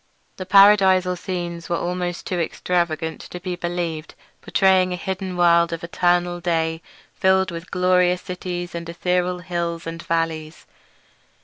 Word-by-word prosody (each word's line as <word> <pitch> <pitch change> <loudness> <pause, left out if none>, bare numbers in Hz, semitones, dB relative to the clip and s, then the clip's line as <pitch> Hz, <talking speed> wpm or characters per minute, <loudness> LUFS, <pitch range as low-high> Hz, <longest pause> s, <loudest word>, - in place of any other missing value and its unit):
The 185 - -6
paradisal 190 -2 +6
scenes 175 -2 -5
were 170 - +1
almost 175 0 -3
too 180 - -2
extravagant 165 -1 -1
to 180 - -7
be 180 0 -4
believed; 175 -3 -4 0.3
portraying 190 -1 +3
a - - -1
hidden 185 0 -4
world 170 -1 +4
of 165 0 -5
eternal 175 0 +1
day 165 -2 -1 0.3
filled 190 0 +2
with 170 +1 -8
glorious 180 0 +2
cities 180 -1 -5
and 170 0 -6
ethereal 180 +1 0
hills 170 -1 -3
and 165 +1 -6
valleys. 165 -2 -3
175 Hz, 135 wpm, -22 LUFS, 170-180 Hz, 0.3 s, paradisal